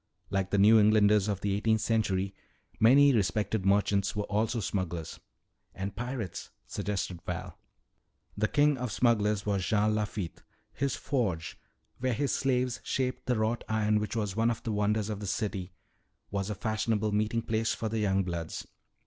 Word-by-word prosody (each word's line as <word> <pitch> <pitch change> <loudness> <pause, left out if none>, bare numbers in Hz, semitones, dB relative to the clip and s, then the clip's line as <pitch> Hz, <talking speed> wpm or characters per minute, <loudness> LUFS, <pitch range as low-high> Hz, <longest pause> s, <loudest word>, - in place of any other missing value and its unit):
Like 95 -1 0
the 100 - +1
New 110 +3 +7
Englanders 105 -1 +4
of 100 -2 -2
the 100 -1 0
eighteenth 110 +2 +1
century, 100 -4 0 0.5
many 140 +5 +6
respected 100 -1 0
merchants 100 0 +2
were 105 - -1
also 110 +3 0
smugglers." 90 -5 -3 0.6
"And 95 +1 -4
pirates," 120 -4 -5 0.2
suggested 95 -3 -3
Val. 90 0 -6 0.8
"The 105 +1 +1
king 145 0 +3
of 125 -3 -3
smugglers 105 -2 +2
was 100 -3 0
Jean 105 +3 +2
Lafitte. 105 -4 -3 0.3
His 140 0 -1
forge 100 - -2 0.4
where 130 0 0
his 140 +5 0
slaves 125 -2 0
shaped 130 -1 -2
the 125 -2 +2
wrought 110 +2 0
iron 105 -1 +2
which 105 +2 -3
was 105 -4 -2
one 115 +1 +2
of 120 - -3
the 115 - -2
wonders 105 +1 0
of 105 - -4
the 105 - -5
city 100 -2 -2 0.6
was 100 0 -2
a 105 - -2
fashionable 110 +1 0
meeting 110 +2 0
place 110 0 0
for 110 - -3
the 110 +1 -2
young 95 -2 +2
bloods. 85 -3 -4
105 Hz, 165 wpm, -29 LUFS, 100-115 Hz, 0.8 s, New